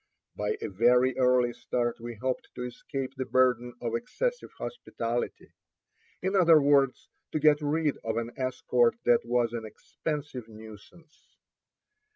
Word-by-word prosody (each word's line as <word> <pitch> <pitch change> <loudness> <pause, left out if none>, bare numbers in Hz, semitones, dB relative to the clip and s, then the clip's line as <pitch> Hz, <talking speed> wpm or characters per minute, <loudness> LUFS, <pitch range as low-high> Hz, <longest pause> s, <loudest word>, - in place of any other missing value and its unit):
By 105 0 -2
a - - -1
very 125 +5 +3
early 125 -1 +3
start 120 -1 -2
we 120 0 -7
hoped 130 +4 -3
to 125 - -5
escape 130 +2 -5
the 130 - -3
burden 125 -2 +2
of 115 -1 -3
excessive 485 - -2
hospitality; 120 - -4 0.7
in 190 +2 0
other 170 -4 +7
words, 140 -2 +3 0.3
to 155 - +1
get 150 0 +4
rid 150 0 0
of 115 0 -2
an 115 0 -2
escort 130 -2 +1
that 120 - +5
was 120 -1 +1
an 115 -1 -4
expensive 130 +3 -5
nuisance. 110 - -15
125 Hz, 140 wpm, -28 LUFS, 115-145 Hz, 0.7 s, other